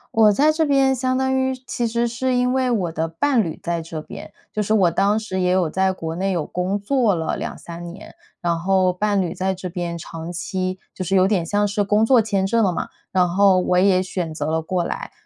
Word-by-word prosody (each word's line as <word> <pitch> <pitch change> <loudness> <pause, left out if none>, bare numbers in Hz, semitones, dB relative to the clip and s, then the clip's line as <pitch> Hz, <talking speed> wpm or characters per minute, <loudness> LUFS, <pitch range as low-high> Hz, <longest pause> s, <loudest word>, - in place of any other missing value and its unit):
我 215 -2 +6
在 290 +9 +3
这 320 0 +1
边 270 -2 +3
相 255 +1 0
当 265 0 +1
于 260 0 +1
其 240 - -2
实 235 +1 0
是 255 +2 -1
因 250 +1 +2
为 260 -1 +1
我 185 -7 0
的 160 0 -1
伴 235 - +1
侣 160 - -5
在 170 -1 -2
这 160 -1 -6
边， 210 +6 -10 0.2
就 210 - -1
是 215 +2 0
我 190 -5 +4
当 200 +5 +2
时 190 -4 -3
也 180 0 +2
有 185 -3 +2
在 190 +3 +1
国 165 -3 -5
内 195 +2 -1
有 170 -5 -1
工 185 +3 -2
作 235 0 +2
了 160 -2 -2
2、3 170 0 -7
年， 195 +4 -12 0.2
然 170 -1 0
后 185 +1 +2
伴 205 +1 +1
侣 175 -2 -2
在 190 +1 -1
这 185 0 -6
边 175 -1 -4
长 165 0 -7
期 185 +1 -3
就 185 - -5
是 195 +2 +1
有 185 +1 +4
点 185 -5 +1
像 205 +3 +1
是 205 +1 0
工 210 +2 +2
作 245 -2 +5
签 200 -3 0
证 230 +3 +2
了 190 - +2
嘛， - - -3 0.2
然 180 -1 +3
后 190 +1 +4
我 180 0 +1
也 185 0 +4
选 180 -3 -4
择 - - -3
了 160 0 0
过 175 +1 -2
来， - - -5
190 Hz, 250 characters per minute, -21 LUFS, 175-220 Hz, 0.2 s, 我